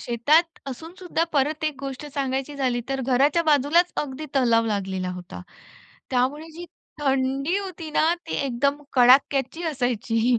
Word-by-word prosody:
शेतात 285 +8 +3 0.3
असूनसुद्धा 335 +4 -3
परत 300 +2 0
एक 305 -2 0
गोष्ट 275 +1 -6
सांगायची 270 +1 -2
झाली 250 -3 0
तर 270 0 -2
घराच्या 275 +6 +3
बाजूलाच 310 +4 +3
अगदी 290 +2 -7
तलाव 235 -4 +3
लागलेला 190 -3 -2
होता. 180 - -8 0.7
त्यामुळे 265 +5 0
जी 345 +2 -8 0.4
थंडी 270 +4 0
होती 355 -5 -7
ना 300 - +2 0.3
ती - - -3
एकदम 280 +3 0
कडाक्याची 270 +4 +4
असायची. 245 -5 0
270 Hz, 135 wpm, -24 LUFS, 245-310 Hz, 0.7 s, कडाक्याची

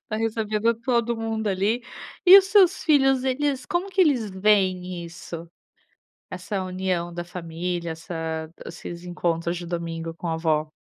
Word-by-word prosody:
Tá 215 - -2
recebendo 220 0 0
todo 235 0 0
mundo 225 -1 -3
ali. 200 +5 +1 0.5
E 375 +2 +12
os 385 - +3
seus 385 -2 +4
filhos 270 -4 +4
eles 265 0 0
como 365 +3 -1
que 380 - +1
eles 255 - +3
veem 185 -3 +1
isso? 170 0 -9 0.8
Essa 185 +1 -3
união 185 -2 -2
da 175 0 -4
família, 170 0 -4
essa 160 -1 -5 0.2
esses 170 0 -8
encontros 170 -1 -1
de 175 - -6
domingo 165 -1 -4
com 175 - -5
a 165 - 0
avó? 155 -2 0
185 Hz, 150 wpm, -24 LUFS, 170-230 Hz, 0.8 s, E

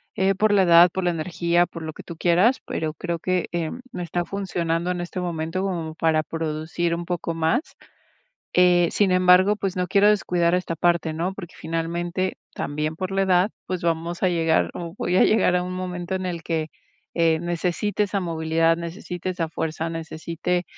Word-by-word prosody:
eh, 195 +1 +2
por 210 +2 +2
la 200 - +5
edad, 170 0 +7
por 190 - -2
la 175 - +2
energía, 170 +1 +1
por 165 -1 -9
lo 160 - -5
que - - -11
tú 170 - -8
quieras, 180 +10 +3
pero 155 -1 -2
creo 170 0 -3
que, 180 0 0
eh, 170 -2 -2 0.2
no 180 - -5
está 175 +1 -2
funcionando 175 -2 -2
en 180 -1 -3
este 175 +2 -5
momento 170 +1 -2
como 170 -5 -3
para 160 -1 +2
producir 160 +2 -2
un 170 0 -5
poco 170 -1 -3
más, 165 - +1 0.9
eh, 175 -1 +5
sin 195 -3 +2
embargo, 185 +2 +5
pues, 195 -2 -3
no 180 0 0
quiero 200 +3 +4
descuidar 175 -4 +2
esta 175 -2 -2
parte, 170 -1 +1
¿no?, 175 +4 -2
porque 180 -3 -9
finalmente, 170 +3 -2 0.2
también 150 +2 -3
por 185 +2 -4
la 195 - +2
edad, 185 +1 +3 0.2
pues, 185 -1 -3
vamos 170 +1 -1
a - - +5
llegar, 165 -2 +2
o, 170 -1 -6
voy 180 - 0
a - - +6
llegar 205 -4 +3
a 180 - +2
un 180 - -5
momento 185 0 -3
en 185 0 -4
el 170 -2 -4
que, 160 -1 -2 0.5
eh, 165 -1 +3
necesite 175 +5 -1
esa 200 0 -2
movilidad, 165 -1 +1
necesite 175 +1 -5
esa 175 -3 -2
fuerza, 160 0 -3
necesite, 165 +2 -3
175 Hz, 190 wpm, -24 LUFS, 165-185 Hz, 0.9 s, edad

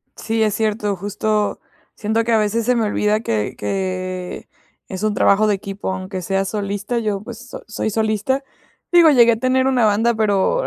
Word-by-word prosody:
Sí, 225 0 -2
es 215 -2 +2
cierto, 210 -2 -1
justo 205 +2 -1 0.4
siento 220 +2 0
que 235 - -1
a 225 - +4
veces, 215 +2 0
se 250 +1 +2
me 230 -2 +1
olvida 210 0 +1
que 110 - -2
que 185 - -4 0.4
es 190 +1 -6
un 215 -1 +1
trabajo 205 +1 +3
de 205 - +2
equipo, 195 0 -5
aunque 185 0 -5
sea 195 +2 -1
solista, 205 +3 -3
yo, 210 -3 -2
pues, 240 +2 -10
so - - -9
soy 215 0 -2
solista, 220 +5 0 0.5
digo, 345 -3 +7
llegué 235 -4 +6
a - - -1
tener 260 +1 +2
una 250 -4 +3
banda, 220 +3 +3
pero 215 - +1
215 Hz, 185 wpm, -20 LUFS, 195-230 Hz, 0.5 s, digo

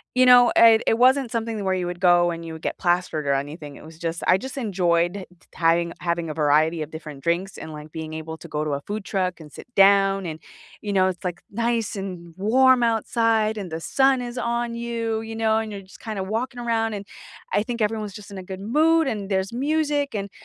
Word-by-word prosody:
you 255 0 +5
know, 245 -1 +8
uh, 225 -1 +6
it 225 - +2
wasn't 260 0 +4
something 230 -1 -2
the 205 - -4
where 190 -1 +1
you 180 -1 -1
would 175 0 -5
go 175 -1 +4
and 170 0 -6
you 165 -1 -7
would 160 - -9
get - - -3
plastered 175 -4 0
or 140 - +2
anything, 145 +1 -4
it - - -13
was 160 0 -13
just 165 0 -3
I 185 - +6
just 265 +7 -8
enjoyed 180 -4 0
t - - -27
having 170 0 +2
having 170 -1 -1
a - - -3
variety 155 +2 +2
of 155 - -5
different 155 -3 -9
drinks 175 +3 -1
and, 160 - -8
like, 150 0 -10
being 160 0 -6
able 160 0 -6
to 170 - -11
go 150 -1 -2
to 150 - -2
a 140 0 -2
food 205 +3 -5
truck 185 -3 -2
and 155 -2 -12
sit - - -12
down 195 -1 +5
and, 160 -2 -5 0.4
you 205 - -4
know, 190 -1 +4
it's, 185 -1 -4
like, 180 -2 -4
nice 230 0 -1
and 180 -4 -7
warm 250 +5 +4
outside 225 -1 +1
and 190 -5 -6
the 160 - -3
sun 265 +8 +2
is 240 0 -6
on 235 0 -1
you, 230 -1 -2
you 225 0 -7
know, 220 -1 +2
and 220 -1 -4
you're 200 -1 -6
just 190 0 -16
kinda 215 -4 -4
walking 240 +6 -3
around, 225 -2 0
and 200 -1 -6 0.5
I 205 - +2
think 235 -1 -4
everyone's 210 -2 -1
just 205 -1 -11
in 200 - -8
a 190 - -7
good 190 +1 -7
mood, 315 +9 +3
and 205 -5 -3
there's 190 +1 -1
music 290 +1 0
and 200 -1 -3
195 Hz, 240 wpm, -23 LUFS, 170-230 Hz, 0.5 s, know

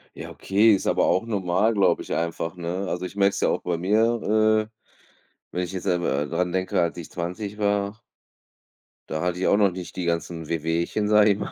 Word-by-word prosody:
Ja, - - -8
okay, 105 +4 +3
ist 95 - -1
aber - - +2
auch 95 - +2
normal, 100 +1 +1
glaube 95 -4 +3
ich - - -9
einfach, 85 +1 -3
ne? 90 +2 -4
Also 90 +1 -3
ich 90 - -8
merke 100 -1 +4
es - - -4
ja - - +3
auch - - -1
bei 85 -1 -2
mir, 110 +2 +2
äh, 110 - -33 0.8
wenn 90 - -2
ich 90 - -5
jetzt 95 - -4
selber, 85 -7 0
äh, - - -5
dran 90 +3 -1
denke, 95 0 0
als 85 0 -1
ich 85 - -8
20 90 +4 -5
war 100 +1 0 1.1
da 80 - -2
hatte 90 0 -1
ich 95 - +1
auch 100 - +4
noch 100 -2 +4
nicht 90 0 -8
die 90 - -3
ganzen 85 -1 -3
Wehwehchen, 85 +5 -1
sage 105 0 +6
ich 100 - -1
mal, - - -4
95 Hz, 220 wpm, -24 LUFS, 85-105 Hz, 1.1 s, sage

